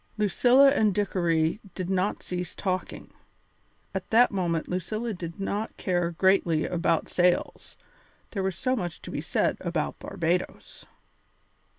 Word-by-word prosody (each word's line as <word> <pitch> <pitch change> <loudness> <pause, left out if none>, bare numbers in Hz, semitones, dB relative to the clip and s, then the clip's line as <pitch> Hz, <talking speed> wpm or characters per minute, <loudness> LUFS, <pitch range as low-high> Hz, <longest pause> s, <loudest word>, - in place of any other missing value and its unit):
Lucilla 245 +6 +5
and 215 -8 +2
Dickory 170 -4 +1 0.2
did 185 -2 -3
not 190 +2 -1
cease 180 -1 -4
talking. 185 -2 -4 0.8
At 190 -1 -4
that 240 +2 +5
moment 170 -4 -1
Lucilla 215 +6 -3
did 170 -2 -7
not 205 +2 -3
care 175 -2 0
greatly 170 -2 +2
about 170 -2 0
sails, 180 0 0 0.5
there 200 - -2
was 190 -2 -1
so 255 +6 0
much 175 -8 -5
to - - -7
be - - -3
said 165 - 0
about 170 -4 -3
Barbadoes. 180 -1 -3
185 Hz, 130 wpm, -27 LUFS, 170-205 Hz, 0.8 s, Lucilla